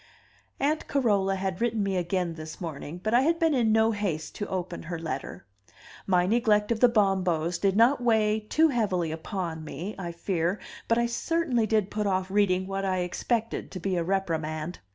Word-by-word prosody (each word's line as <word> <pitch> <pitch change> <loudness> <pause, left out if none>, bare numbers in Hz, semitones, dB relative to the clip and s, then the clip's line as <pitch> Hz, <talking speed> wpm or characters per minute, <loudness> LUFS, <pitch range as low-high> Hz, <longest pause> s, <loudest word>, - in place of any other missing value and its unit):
Aunt 300 +3 0
Carola 205 -8 +2
had 190 0 -3
written 230 -3 +1
me 195 -1 -1
again 180 -1 -1
this 155 -1 -8
morning, 165 0 -6
but 215 - 0
I 245 - +6
had 330 +4 +2
been 325 -2 +2
in 235 -5 +2
no 220 +1 +4
haste 185 -8 -3
to 205 - -3
open 180 -2 -4
her 170 +1 -5
letter; 155 -10 -5 0.6
my 180 -2 +3
neglect 210 0 +2
of 230 - +1
the 245 - +6
Bombos 185 -6 +1
did 195 -1 +2
not 245 +5 +4
weigh 220 -2 +3
too 310 +10 +2
heavily 190 - 0
upon 165 -1 -4
me, 165 +7 -6
I 175 -2 -4
fear, 170 +2 -1 0.3
but 230 - +3
I 235 - +2
certainly 245 -2 0
did 215 -2 +1
put 210 -1 -1
off 190 -1 -1
reading 190 -2 +2
what 195 0 -3
I 185 -1 0
expected 225 +6 -2
to 185 - -7
be 185 +2 -1
a 170 - 0
reprimand. 165 -3 -2
195 Hz, 190 wpm, -27 LUFS, 175-225 Hz, 0.6 s, I